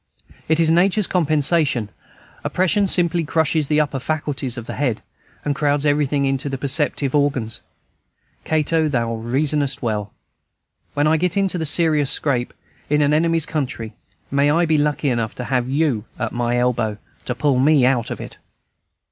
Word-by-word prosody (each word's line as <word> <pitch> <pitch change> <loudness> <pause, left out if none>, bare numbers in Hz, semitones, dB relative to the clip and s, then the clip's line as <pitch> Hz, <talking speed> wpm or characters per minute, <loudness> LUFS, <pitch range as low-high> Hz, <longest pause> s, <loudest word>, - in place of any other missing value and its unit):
It 160 +1 +2
is 165 -1 +4
Nature's 190 +4 +3
compensation; 155 - +1 0.5
oppression 195 +2 +1
simply 175 -2 +2
crushes 160 -1 +1
the 150 +1 +2
upper 145 -3 0
faculties 140 -2 -2
of 120 - -6
the - - -6
head, 125 -6 -2 0.4
and 145 - +1
crowds 145 0 0
everything 145 -1 +1
into 135 +1 -1
the 135 - -3
perceptive 140 0 0
organs. 140 -6 0 0.8
Cato, 160 0 +1
thou 120 -5 -1
reasonest 135 +5 0
well! 105 -3 -2 0.8
When 145 - +2
I 155 +1 +3
get 180 +3 -1
into 190 -2 0
any 160 - -2
serious 150 -2 +2
scrape, 125 -5 0 0.4
in 150 0 +3
an 145 +1 +2
enemy's 165 0 +2
country, 125 -7 -4 0.4
may 140 +1 +3
I 170 +3 +3
be 155 -2 +2
lucky 145 -1 0
enough 115 -3 -2
to 125 - -5
have 125 -1 -1
you 135 -6 0
at - - -3
my 120 0 -1
elbow, 120 -4 0 0.3
to 125 - -3
pull 140 -1 +1
me 140 -1 +4
out 125 -3 +1
of - - -5
it! - - -9
145 Hz, 165 wpm, -20 LUFS, 125-155 Hz, 0.8 s, is